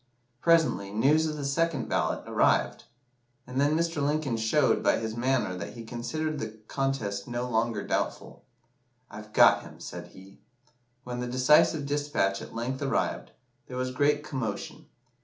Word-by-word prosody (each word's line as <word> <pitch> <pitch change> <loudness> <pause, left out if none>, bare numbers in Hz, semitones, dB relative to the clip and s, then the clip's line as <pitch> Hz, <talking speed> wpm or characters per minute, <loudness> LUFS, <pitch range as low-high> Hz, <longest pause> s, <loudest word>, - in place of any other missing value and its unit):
Presently, 165 -12 +3
news 145 +9 +3
of 155 - -3
the 145 - -4
second 165 +3 0
ballot - - 0
arrived, - - +1 0.6
and 125 +2 -2
then 145 +2 +3
Mr. 165 -2 -1
Lincoln 145 -3 0
showed 110 0 +2
by - - +3
his 110 -1 -4
manner 125 -6 0
that 85 -2 -6
he 115 - -8
considered 140 +7 -3
the 110 -2 -6
contest 115 -8 -2
no 120 +1 -3
longer 115 -3 0
doubtful. - - -3 0.7
'I've 105 0 -10
got - - +6
him,' - - -13
said 90 0 -8
he. 95 +2 -16 0.6
When 125 -1 -5
the 125 - -3
decisive 135 +4 +4
despatch 145 -9 0
at - - -10
length 125 +3 -3
arrived, 140 - -1 0.4
there 125 - -7
was 130 0 -1
great 145 +3 +2
commotion. 125 -9 -5
125 Hz, 155 wpm, -28 LUFS, 110-145 Hz, 0.7 s, got